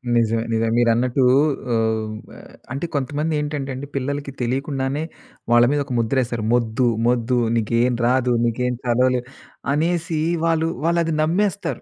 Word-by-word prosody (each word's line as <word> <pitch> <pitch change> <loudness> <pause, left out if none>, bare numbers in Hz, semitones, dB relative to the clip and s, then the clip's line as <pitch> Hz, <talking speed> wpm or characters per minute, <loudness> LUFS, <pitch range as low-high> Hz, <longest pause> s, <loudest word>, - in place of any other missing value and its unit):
నిజమే 115 -1 +2
నిజమే. 115 0 +1
మీరన్నట్టూ 120 +2 +2 0.5
ఆహ్, 110 -1 +1
హ్మ్. 110 0 -6 0.2
ఆహ్, - - -14 0.2
అంటే 140 +5 -3
కొంతమందేంటంటే 150 0 -2
అండి 140 +2 -6
పిల్లలకి 140 +1 -3
తెలియకుండానే 135 +3 -1 0.5
వాళ్ళ 120 0 +6
మీద 145 - +1
ఒక 130 - -5
ముద్రేస్తారు. 120 -1 0
"మొద్దు 120 +1 +1 0.2
మొద్దు 125 0 +1 0.2
నీకేం 115 +2 +1
రాదు, 125 0 +2
నీకేం 125 +2 0
చదవలేవు." 125 +1 +2 0.5
అనేసి 165 0 0 0.3
వాళ్ళు 165 -1 +2 0.2
వాళ్ళది 170 -1 +1
నమ్మేస్తారు. 195 +5 0
130 Hz, 125 wpm, -21 LUFS, 120-150 Hz, 0.5 s, వాళ్ళ